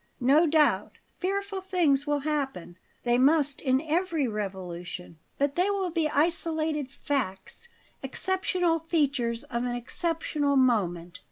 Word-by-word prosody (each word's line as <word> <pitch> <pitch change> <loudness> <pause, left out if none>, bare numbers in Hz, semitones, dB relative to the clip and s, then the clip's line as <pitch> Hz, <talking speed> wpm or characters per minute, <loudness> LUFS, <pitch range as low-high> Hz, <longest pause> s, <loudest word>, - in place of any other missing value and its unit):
No 285 +6 +4
doubt 310 -1 +2 0.3
fearful 395 +1 -2
things 330 -7 +1
will 290 -1 +1
happen; 270 - -3 0.3
they 240 0 +2
must 285 +1 +3
in 260 -2 +2
every 325 -2 0
revolution. 180 -5 -6 0.2
But 280 0 +1
they 360 +3 +2
will 390 -3 -1
be 320 -2 +1
isolated 315 -2 0
facts 270 - -4 0.3
exceptional 355 +3 0
features 280 -8 0
of 235 -1 -3
an 245 -1 -2
exceptional 295 +2 -1
moment. 185 -9 +1
285 Hz, 120 wpm, -27 LUFS, 240-330 Hz, 0.3 s, No